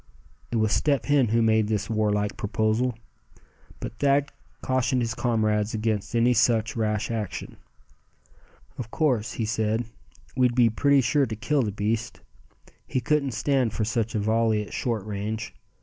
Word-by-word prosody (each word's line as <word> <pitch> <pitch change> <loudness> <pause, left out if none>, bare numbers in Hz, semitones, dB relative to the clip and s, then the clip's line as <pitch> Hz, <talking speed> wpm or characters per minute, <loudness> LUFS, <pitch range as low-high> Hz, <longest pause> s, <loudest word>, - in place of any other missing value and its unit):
It - - -2
was 110 -2 +2
Step 140 -1 +1
Hen 145 -4 +3
who 115 +2 +2
made 110 -1 +3
this 105 -2 -1
war 110 -1 +1
like 105 0 -1
proposal; 110 +3 0 0.8
but 115 - -7
Thad 140 0 +2 0.3
cautioned 130 -1 +1
his 115 -1 -2
comrades 110 -3 0
against 110 0 -2
any 120 +1 +4
such 115 -1 +2
rash 110 -1 -1
action. 110 -4 -5 1.2
"Of 120 -2 -5
course," 125 -5 0
he 115 - -2
said, 110 +1 0 0.5
"we'd 125 -2 +2
be 120 -3 +4
pretty 140 +4 +3
sure 135 +3 +2
to 110 - -4
kill 145 +6 0
the 110 -4 -1
beast. 110 +3 -2 0.7
He 130 - -1
couldn't 145 -1 0
stand 125 -1 +1
for 105 +1 -1
such 115 0 -1
a - - +1
volley 110 0 +1
at - - -12
short 115 -5 -2
range. 105 +2 -4
115 Hz, 160 wpm, -25 LUFS, 110-125 Hz, 1.2 s, any